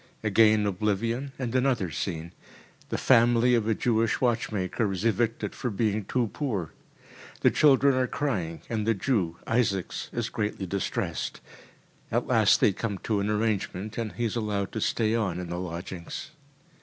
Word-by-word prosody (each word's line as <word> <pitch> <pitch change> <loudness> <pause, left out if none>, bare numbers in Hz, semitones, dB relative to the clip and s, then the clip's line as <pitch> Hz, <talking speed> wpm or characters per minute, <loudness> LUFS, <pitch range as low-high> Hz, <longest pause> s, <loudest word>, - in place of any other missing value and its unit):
Again 110 0 +4
oblivion, 105 +7 -1
and 125 -3 -3
another 125 -9 +1
scene. 85 +1 -4 0.6
The - - -1
family 120 0 +4
of 115 -3 +2
a 110 - +2
Jewish 115 -1 +1
watchmaker 110 -4 0
is 95 +3 -3
evicted 115 -1 0
for 125 - -3
being 105 -1 0
too 120 0 0
poor. 105 - -2 0.7
The - - +5
children 140 -1 +5
are 130 0 +1
crying, 95 - -2
and 110 -2 -2
the 115 - +3
Jew, 95 -7 0
Isaaks, 105 -6 0
is - - -2
greatly 105 -2 -2
distressed. 95 +1 -3 0.7
At - - +1
last - - +4
they 100 - +5
come 100 0 -3
to 105 -3 0
an 100 +1 -1
arrangement, 105 -2 -1
and 110 -2 -3
he 120 - -2
is 110 - -2
allowed 105 -4 -1
to 110 - -4
stay 110 +1 +1
on 105 -7 0
in 90 -1 -5
the 85 - -3
lodgings. 90 - -6
110 Hz, 160 wpm, -27 LUFS, 95-120 Hz, 0.7 s, The